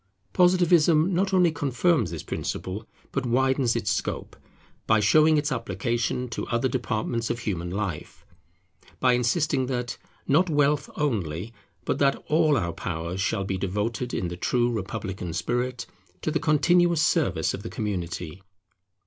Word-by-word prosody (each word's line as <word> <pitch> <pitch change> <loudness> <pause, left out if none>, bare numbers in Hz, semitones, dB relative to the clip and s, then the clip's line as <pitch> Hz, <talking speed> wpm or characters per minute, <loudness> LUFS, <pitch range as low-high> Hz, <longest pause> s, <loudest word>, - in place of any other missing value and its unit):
Positivism 175 -2 +4
not 190 +3 +1
only 180 -3 +4
confirms 145 - +1
this 85 -1 -6
principle, 100 +4 -4 0.2
but 135 - -1
widens 130 0 +2
its - - 0
scope, - - -3 0.5
by 110 - +4
showing 155 +9 +5
its 145 0 0
application 115 +2 -1
to 115 - -4
other 120 +2 +1
departments 115 -2 -2
of 120 - -1
human 90 -6 -3
life; 95 -4 -5 0.7
by 125 -1 +4
insisting 130 +2 +1
that, 125 -2 -3 0.3
not 165 +6 +3
wealth 145 -1 +2
only, 105 - -2 0.3
but - - -1
that 140 -1 +3
all 155 -2 +4
our 85 -6 -1
powers 85 +2 -4
shall 95 0 0
be 95 -1 -3
devoted 105 +6 -2
in 90 - -2
the 90 - -5
true 120 +5 +1
republican 95 -5 -4
spirit 125 +6 -2 0.4
to 155 - 0
the 160 - 0
continuous 170 +2 +3
service - - +1
of - - -5
the - - -6
community. 90 -4 -4
120 Hz, 145 wpm, -26 LUFS, 100-150 Hz, 0.7 s, showing